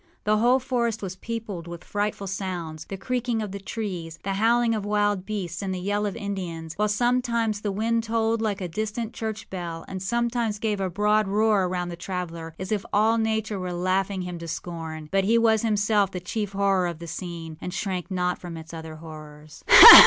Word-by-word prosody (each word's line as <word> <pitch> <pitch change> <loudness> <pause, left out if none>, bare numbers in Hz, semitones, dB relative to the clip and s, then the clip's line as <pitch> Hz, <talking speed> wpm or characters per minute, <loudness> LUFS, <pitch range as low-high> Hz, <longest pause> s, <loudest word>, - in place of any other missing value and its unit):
The 215 +1 +3
whole 240 +4 +5
forest 240 -5 -1
was 185 -1 -4
peopled 210 -4 -5
with 170 0 -8
frightful 205 -1 -2
soundsâthe 185 -2 -4
creaking 245 -1 -1
of 205 - -5
the 200 - -5
trees, 185 -6 -5
the 195 - -1
howling 230 +3 +3
of 215 -2 -1
wild 205 -2 +1
beasts, 185 -5 -3
and 195 -1 -2
the - - -3
yell 205 +3 0
of 200 - -4
Indians; 180 -7 -4
while 210 +4 +1
sometimes 235 -1 +1
the 205 - -1
wind 225 +3 +1
tolled 225 0 +1
like 205 -3 -1
a 180 - -2
distant 215 +5 -3
church 220 -1 -4
bell, 170 -3 -5
and 190 -1 -5
sometimes 235 +1 0
gave 210 -2 -1
a 190 - 0
broad 210 +3 +2
roar 210 -1 +3
around 180 -1 -2
the 170 - -5
traveller, 170 -2 -5
as 190 +2 -5
if 205 -2 0
all 220 +2 +4
Nature 220 -2 0
were 180 -1 -3
laughing 185 +2 0
him 180 -1 -5
to 170 - -7
scorn. 160 -2 -5
But 195 0 +2
he 230 +3 +4
was 225 -2 +4
himself 210 -2 +2
the 185 - -5
chief 200 +3 -3
horror 195 -2 +2
of 170 -2 -4
the 170 - -8
scene, 165 -2 -6
and 180 - -4
shrank 190 -1 -3
not 180 -1 0
from 175 -2 -7
its 160 +1 -10
other 160 -1 -7
horrors. 155 -1 -11
195 Hz, 200 wpm, -26 LUFS, 175-220 Hz, -, whole